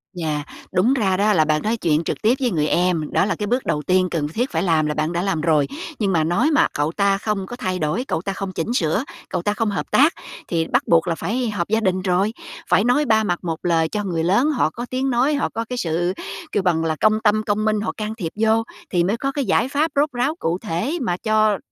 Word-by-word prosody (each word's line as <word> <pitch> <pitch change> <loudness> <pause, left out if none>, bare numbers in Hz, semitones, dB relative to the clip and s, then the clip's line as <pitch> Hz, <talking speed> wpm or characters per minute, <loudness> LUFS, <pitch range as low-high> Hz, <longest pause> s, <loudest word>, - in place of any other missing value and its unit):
Yeah, 155 -4 -2 0.3
đúng 195 +8 +3
ra 195 -8 +1
đó 210 +2 +3
là 160 -5 +3
bạn 155 0 +1
nói 225 +2 0
chuyện 160 -6 +1
trực - - -4
tiếp 225 +2 +4
với 250 -3 0
người 155 -4 +1
em, 170 -2 +1
đó - - +2
là 205 - -1
cái 210 - -3
bước 250 +4 0
đầu 150 - 0
tiên 185 +4 +2
cần 155 -4 -1
thiết 235 - -2
phải 160 0 0
làm 160 -4 +2
là 150 - -1
bạn 155 +2 -1
đã 175 0 -1
làm 190 -4 -1
rồi. 155 -3 +2 0.3
Nhưng 200 -3 +1
mà 165 -3 +2
nói 175 - +2
mà 295 - +4
cậu 145 +2 0
ta 200 +1 +2
không 210 -1 -2
có 240 - -7
thay 185 -7 -3
đổi, 155 +11 -1
cậu 160 - -1
ta 195 +2 -3
không 195 0 -5
chỉnh 185 +6 -3
sửa, 180 +1 +1 0.3
cậu - - -2
ta 205 +4 0
không 220 0 -1
hợp 200 - -4
tác 295 +5 +5 0.3
thì 165 -2 -1
bắt - - +1
buộc 165 +1 +3
là 170 - 0
phải 240 +7 -2
họp 185 -5 -2
gia 220 +2 +2
đình 185 -4 0
rồi, 190 +3 +1 0.4
phải 195 - +4
nói 250 +6 +2
ba 220 -2 +3
mặt 175 -4 -1
một 165 -2 -3
lời 165 -2 +2
cho 210 +3 -2
người 170 -4 -2
lớn 200 - +3
họ 255 - +1
có 235 +9 -6
tiếng 260 +1 -1
nói, 255 +4 +2
họ 285 - 0
có 230 - -4
cái 250 - -3
sự 175 -2 0 0.4
kêu 205 - 0
bằng 170 -3 +1
là 160 -1 0
công 215 +6 +2
tâm 215 0 +3
công 215 0 0
minh 215 -1 +1
họ 220 - -2
can 215 0 -4
thiệp 175 -8 -4
vô 220 +1 +2 0.3
thì 175 -2 +2
mới 200 +6 0
có 275 +3 -2
cái 280 -1 -2
giải 235 - +2
pháp 295 +3 0
rốt 290 +2 +2
ráo, 255 +5 -1
cụ 165 +2 -1
thể 220 - -2
mà 175 -8 -1
cho 215 -1 +2
195 Hz, 270 wpm, -21 LUFS, 170-225 Hz, 0.4 s, tác